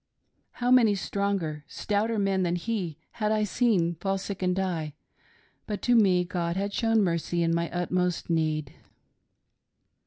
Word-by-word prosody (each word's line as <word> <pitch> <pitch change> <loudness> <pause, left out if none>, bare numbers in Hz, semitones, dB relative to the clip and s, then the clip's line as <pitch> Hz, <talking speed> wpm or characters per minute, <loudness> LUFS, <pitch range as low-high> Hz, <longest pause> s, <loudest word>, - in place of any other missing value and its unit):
How 245 0 -1
many 230 -5 +6
stronger, 195 -6 -2
stouter 215 +2 -1
men 195 -2 +1
than 175 -1 +1
he 175 -5 -3
had 215 -2 -1
I 215 -1 +2
seen 205 -6 +2
fall 195 0 0
sick 195 0 -6
and 180 -1 +1
die; 170 -6 -2 0.7
but 210 -2 -4
to 245 - +4
me 190 -5 +4
God 175 -1 -2
had 200 +1 -2
shown 225 -1 +2
mercy 170 -1 0
in 165 0 +1
my 170 0 0
utmost 180 0 -1
need. 155 -4 -1
185 Hz, 150 wpm, -27 LUFS, 170-210 Hz, 0.7 s, many